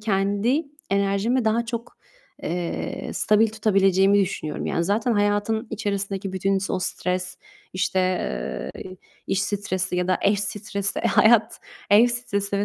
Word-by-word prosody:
Kendi 205 +7 +1 0.3
enerjimi 200 +5 +1
daha 225 +2 +1
çok, 235 0 -6 0.5
eee, 175 0 -4
stabil 215 +1 +3
tutabileceğimi 195 -2 +3
düşünüyorum. 165 -6 -3
Yani, 170 - 0
zaten, 215 +6 +1
hayatın 205 +2 +1
içerisindeki 200 -3 -3
bütün 195 +1 +1
s 195 - -3
o 185 - 0
stres, 180 0 -2 0.3
işte, 185 0 0 0.8
eee, 185 0 -9 0.3
iş 195 - 0
stresi 185 -3 -1
ya 180 0 -1
da 185 - +2
eş 200 0 +3
stresi, 200 -1 -2
hayat, 220 0 +4 0.3
ev 215 +4 +7
stresi 200 -4 -1
200 Hz, 130 wpm, -24 LUFS, 190-220 Hz, 0.8 s, ev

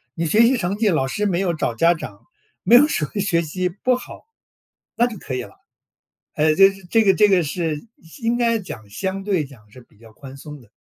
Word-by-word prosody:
你 165 - -2
学 210 +8 +3
习 245 +3 +4
成 180 -1 -2
绩 215 -1 +2
老 155 -7 +1
师 210 +10 -2
没 180 -3 0
有 185 -3 0
找 125 -7 -2
家 170 +9 +4
长， 165 - -9 0.4
没 235 - +5
有 290 +5 +7
什 155 - -1
么 200 +7 -4
学 185 -4 +1
习 180 +3 -2
不 230 +8 0
好， 250 - -10 0.7
那 240 - +3
就 230 -3 -8
可 130 - -6
以 125 - -3
了。 - - -15 0.8
呃， 155 +1 +2
这 195 +3 +6 0.2
这 225 -1 +3
个 195 - +5
这 210 -1 +4
个 190 -3 +3
是 160 +2 -3 0.4
应 230 +1 0
该 230 -1 +2
讲， 145 - -10
相 190 - -4
对 190 -6 0
讲 115 -7 -17
是 125 +4 -15
比 105 - -27
较 115 0 -17
宽 135 +3 -12
松 150 0 -10
的。 105 - -23
180 Hz, 245 characters per minute, -21 LUFS, 150-210 Hz, 0.8 s, 有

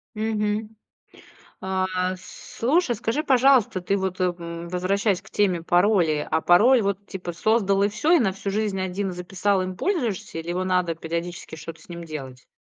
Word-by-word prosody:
Мгм. 215 0 -2 0.9
А, 190 0 0 0.3
слушай, 245 - -1
скажи, 230 +8 -1
пожалуйста, 260 -8 +4
ты 195 +3 0
вот, 190 -1 -3
э, - - +3
м, 170 -1 -4
возвращаясь 185 +2 0
к - - -17
теме 185 -5 +1
паролей. 175 -4 +3
А 160 - 0
пароль 225 +8 +5
вот, 200 0 -2
типа, 180 -3 -6
создал 200 +1 +2
и 200 - +4
всё, 255 +10 -1
и 350 - +7
на 195 -9 +1
всю 195 +1 -4
жизнь 205 -1 -1
1 190 +1 -2
записал, 185 +2 0
им 185 0 -4
пользуешься, 240 - -2
или 165 +1 -5
его 180 +1 -1
надо 180 -2 +1
периодически 170 +1 -5
что-то 160 +1 -9
с - - -19
ним 170 -1 -7
делать? 135 -5 -8
190 Hz, 170 wpm, -24 LUFS, 175-210 Hz, 0.9 s, и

